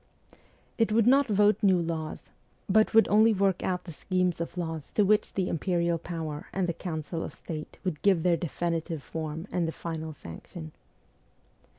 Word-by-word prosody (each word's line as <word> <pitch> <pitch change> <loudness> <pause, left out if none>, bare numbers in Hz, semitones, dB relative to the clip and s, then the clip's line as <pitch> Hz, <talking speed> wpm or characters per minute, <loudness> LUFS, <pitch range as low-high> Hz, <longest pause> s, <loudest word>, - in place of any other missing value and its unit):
It 225 -1 +3
would 220 0 +4
not 275 +3 +5
vote 210 0 +3
new 190 -4 +4
laws, 165 -2 -4 0.4
but 215 +2 +4
would 225 - +7
only 220 +2 +5
work 195 -1 +2
out 180 -1 -1
the 170 - -9
schemes 180 0 0
of 170 +1 -5
laws 160 -4 -4
to 210 - +4
which 210 +2 +2
the 190 -2 0
imperial 170 0 0
power 160 -3 -5
and 190 -1 0
the 170 - 0
Council 165 -1 -4
of - - -7
State 155 -2 -7
would 175 -6 -3
give 190 -5 +3
their 175 -1 +4
definitive 165 -2 -2
form 160 +1 -5
and 175 -2 0
the - - -1
final 160 -1 -5
sanction. 80 - -9
170 Hz, 175 wpm, -28 LUFS, 160-195 Hz, 0.4 s, would